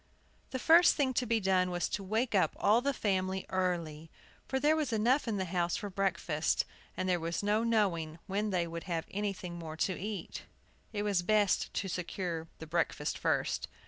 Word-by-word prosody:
The 260 Hz, -, -3 dB
first 330 Hz, +6 st, +6 dB
thing 270 Hz, -3 st, +1 dB
to 250 Hz, 0 st, 0 dB
be 230 Hz, 0 st, +2 dB
done 185 Hz, -2 st, +2 dB
was 175 Hz, -2 st, -1 dB
to 200 Hz, -, -2 dB
wake 220 Hz, +5 st, 0 dB
up 195 Hz, -, +3 dB
all 220 Hz, +4 st, +4 dB
the 280 Hz, +2 st, +1 dB
family 190 Hz, -6 st, -1 dB
early; 170 Hz, -4 st, -2 dB, 0.4 s
for 265 Hz, -, 0 dB
there 300 Hz, +3 st, +4 dB
was 305 Hz, -5 st, -1 dB
enough 235 Hz, +5 st, +2 dB
in 220 Hz, -3 st, 0 dB
the 190 Hz, -, -1 dB
house 175 Hz, -1 st, 0 dB
for 205 Hz, -, -5 dB
breakfast, 175 Hz, -5 st, 0 dB, 0.3 s
and 185 Hz, -, -1 dB
there 180 Hz, -1 st, +2 dB
was 170 Hz, +4 st, -2 dB
no 210 Hz, +2 st, +2 dB
knowing 185 Hz, -9 st, +1 dB
when 205 Hz, +2 st, -1 dB
they 180 Hz, -3 st, +1 dB
would 170 Hz, 0 st, -6 dB
have 170 Hz, -3 st, -2 dB
anything 190 Hz, -4 st, -3 dB
more 160 Hz, -1 st, -7 dB
to 185 Hz, -, +1 dB
eat. 200 Hz, -3 st, -5 dB, 0.5 s
It 205 Hz, -2 st, -2 dB
was 200 Hz, -4 st, +1 dB
best 205 Hz, +1 st, +2 dB
to 195 Hz, -, -1 dB
secure 175 Hz, -2 st, -3 dB
the 160 Hz, -, -8 dB
breakfast 160 Hz, -2 st, -1 dB
first. -, -, 0 dB
190 Hz, 190 wpm, -32 LUFS, 170-215 Hz, 0.5 s, first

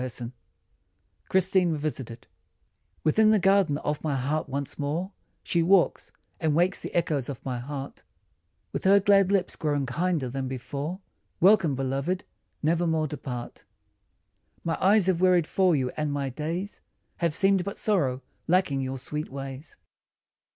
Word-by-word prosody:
119 125 Hz, -1 st, -5 dB, 1.0 s
CHRISTINE 185 Hz, -1 st, +3 dB
REVISITED 140 Hz, -6 st, -4 dB, 0.8 s
WITHIN 215 Hz, +8 st, +4 dB
the 215 Hz, -, +5 dB
garden 190 Hz, -6 st, +3 dB
of 150 Hz, 0 st, -3 dB
my 150 Hz, -3 st, 0 dB
heart 145 Hz, +4 st, -1 dB
once 140 Hz, +2 st, -4 dB
more 160 Hz, +7 st, -2 dB, 0.3 s
She 170 Hz, -, +1 dB
walks, 180 Hz, +1 st, +3 dB, 0.3 s
and 160 Hz, -4 st, +1 dB
wakes 180 Hz, +4 st, +2 dB
the -, -, -6 dB
echoes 150 Hz, -6 st, 0 dB
of 135 Hz, -, -7 dB
my 125 Hz, -2 st, -2 dB
heart 140 Hz, +2 st, -6 dB
i -, -, -24 dB, 0.7 s
With -, -, -3 dB
her 200 Hz, +1 st, +7 dB
glad 195 Hz, -1 st, +4 dB
lips 195 Hz, -2 st, +1 dB
grown 145 Hz, -3 st, -1 dB
kinder 155 Hz, +1 st, -1 dB
than 130 Hz, +1 st, -3 dB
before. 140 Hz, -, -5 dB, 0.4 s
Welcome, 185 Hz, -6 st, +5 dB
beloved! 135 Hz, +7 st, -2 dB, 0.4 s
never 170 Hz, +3 st, +2 dB
more 160 Hz, -1 st, +1 dB
depart. 130 Hz, -5 st, -6 dB, 1.0 s
My 165 Hz, -1 st, 0 dB
eyes 200 Hz, 0 st, +5 dB
have 180 Hz, -2 st, +1 dB
wearied 180 Hz, -3 st, +4 dB
for 185 Hz, 0 st, +2 dB
you, 130 Hz, -3 st, 0 dB
and 150 Hz, -1 st, -1 dB
my 140 Hz, -1 st, -2 dB
days 165 Hz, +9 st, -4 dB, 0.4 s
Have 170 Hz, -3 st, 0 dB
seemed 195 Hz, -1 st, +3 dB
but 200 Hz, +2 st, -5 dB
sorrow, 140 Hz, -12 st, 0 dB, 0.2 s
lacking 170 Hz, -6 st, +2 dB
your 130 Hz, 0 st, -3 dB
sweet 150 Hz, +4 st, -5 dB
ways. 135 Hz, +2 st, -8 dB
155 Hz, 150 wpm, -27 LUFS, 135-185 Hz, 1.0 s, her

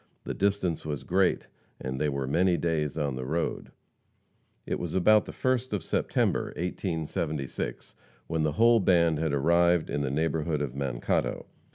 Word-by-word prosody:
The -, -, -4 dB
distance 95 Hz, -4 st, 0 dB
was 75 Hz, -4 st, -4 dB
great, 95 Hz, +4 st, +1 dB, 0.3 s
and 65 Hz, +1 st, -4 dB
they 75 Hz, -, +2 dB
were 70 Hz, -1 st, -2 dB
many 85 Hz, +6 st, +2 dB
days 80 Hz, -3 st, -1 dB
on 70 Hz, -4 st, -1 dB
the 65 Hz, -, -4 dB
road. 80 Hz, +6 st, -2 dB, 0.9 s
It -, -, -2 dB
was 85 Hz, -1 st, -4 dB
about 105 Hz, +3 st, +5 dB
the -, -, -7 dB
1st 130 Hz, -2 st, -1 dB
of 100 Hz, -, -1 dB
September, -, -, 0 dB
1876, 80 Hz, -5 st, -3 dB, 0.3 s
when 80 Hz, -1 st, -1 dB
the 75 Hz, -1 st, +1 dB
whole 115 Hz, +6 st, +5 dB
band 85 Hz, -5 st, +3 dB
had 80 Hz, -1 st, 0 dB
arrived 85 Hz, +4 st, +3 dB
in 75 Hz, -, -1 dB
the 70 Hz, -, -1 dB
neighborhood 80 Hz, +1 st, 0 dB
of 65 Hz, -4 st, -4 dB
Mankato. 65 Hz, -3 st, -1 dB
80 Hz, 160 wpm, -28 LUFS, 70-90 Hz, 0.9 s, about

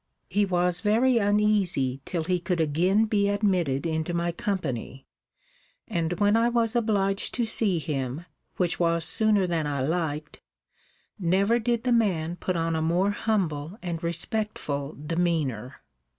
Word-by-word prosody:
He 205 Hz, 0 st, +2 dB
was 180 Hz, -1 st, +1 dB
very 230 Hz, +4 st, +3 dB
uneasy 200 Hz, -, +1 dB
till 170 Hz, -3 st, -2 dB
he 180 Hz, +2 st, 0 dB
could 180 Hz, 0 st, -2 dB
again 175 Hz, +8 st, +2 dB
be 205 Hz, -2 st, +1 dB
admitted 185 Hz, -10 st, 0 dB
into 160 Hz, +1 st, -2 dB
my 170 Hz, 0 st, 0 dB
company, 140 Hz, -, -4 dB, 0.8 s
and 170 Hz, -5 st, -1 dB
when 205 Hz, +3 st, +2 dB
I 230 Hz, +1 st, +3 dB
was 235 Hz, -1 st, 0 dB
obliged 200 Hz, -4 st, 0 dB
to 240 Hz, -, 0 dB
see 210 Hz, -4 st, +2 dB
him, 145 Hz, -1 st, -3 dB, 0.3 s
which 180 Hz, -2 st, 0 dB
was 170 Hz, -1 st, +1 dB
sooner 215 Hz, -3 st, +3 dB
than 165 Hz, -4 st, -1 dB
I 140 Hz, -2 st, -2 dB
liked, 155 Hz, -1 st, -3 dB, 0.8 s
never 195 Hz, +6 st, +2 dB
did 235 Hz, 0 st, -1 dB
the 250 Hz, -, 0 dB
man 175 Hz, -8 st, +1 dB
put 180 Hz, 0 st, -2 dB
on 165 Hz, 0 st, 0 dB
a 160 Hz, -, 0 dB
more 175 Hz, +5 st, +1 dB
humble 185 Hz, -6 st, -2 dB
and 170 Hz, -2 st, -4 dB
respectful 170 Hz, -, -2 dB
demeanor. 150 Hz, -6 st, -2 dB
175 Hz, 145 wpm, -26 LUFS, 160-205 Hz, 0.8 s, very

